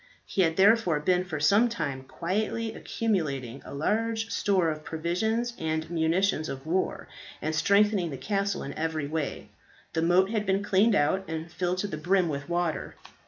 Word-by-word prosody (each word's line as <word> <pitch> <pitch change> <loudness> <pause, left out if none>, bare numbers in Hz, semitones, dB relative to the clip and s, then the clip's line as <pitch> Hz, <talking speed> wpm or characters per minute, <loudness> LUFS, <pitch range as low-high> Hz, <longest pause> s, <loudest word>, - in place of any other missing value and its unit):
He 195 - 0
had 165 -2 +2
therefore 195 -5 +4
been 180 +4 +1
for 155 -5 -4
some 205 +10 +4
time 145 - -3
quietly 215 +10 -2
accumulating 140 - -2
a - - -10
large 220 +9 -1
store 185 -5 +2
of 155 0 -6
provisions 220 +10 -1
and 160 0 -2
munitions 165 0 +1
of 135 +1 -6
war, 180 +4 -1 0.3
and 155 - -2
strengthening 200 +2 +3
the 135 - -5
castle 200 +2 -1
in 140 - -5
every 160 -2 -2
way. 150 0 -4 0.4
The 160 - 0
moat 180 +4 +3
had 215 -2 -1
been 195 +1 +1
cleaned 205 +2 +3
out, 190 +6 +2
and 160 +1 -5
filled 180 +1 -1
to - - -1
the 175 - -5
brim 180 +2 +2
with 140 +1 -4
water. 175 -2 -1
175 Hz, 170 wpm, -28 LUFS, 155-200 Hz, 0.4 s, therefore